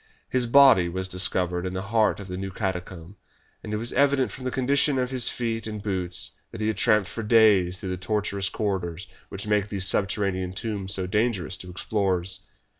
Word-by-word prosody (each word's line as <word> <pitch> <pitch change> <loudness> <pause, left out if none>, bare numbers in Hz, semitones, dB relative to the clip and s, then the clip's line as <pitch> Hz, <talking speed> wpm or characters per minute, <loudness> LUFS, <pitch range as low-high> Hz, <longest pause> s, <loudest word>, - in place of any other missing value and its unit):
His 125 -2 +2
body 130 -9 +6
was 95 +2 -3
discovered 90 -1 0
in 95 0 -4
the 95 - -3
heart 105 +1 +1
of 100 - -8
the 90 - -5
new 95 +1 -4
catacomb, 95 -1 -5 0.5
and 105 - -6
it 105 - -1
was 115 +2 -3
evident 140 -1 +2
from 130 - -9
the - - 0
condition 135 +2 +2
of 125 0 -1
his 130 -3 +3
feet 115 -2 -3
and 105 -1 -5
boots 95 -4 -1 0.2
that 115 - -10
he 110 0 0
had 110 - -2
tramped 105 -1 +3
for 115 - -6
days 105 -5 +4
through 95 -1 -6
the 90 - -3
tortuous 100 +1 -1
corridors 95 -3 -3 0.2
which 100 - -6
make 105 -1 +1
these 95 -3 -1
subterranean 95 -1 0
tombs 100 -2 -1
so 95 - -2
dangerous 105 -2 0
to 90 -1 -9
explorers. 95 -1 -1
100 Hz, 195 wpm, -25 LUFS, 95-110 Hz, 0.5 s, body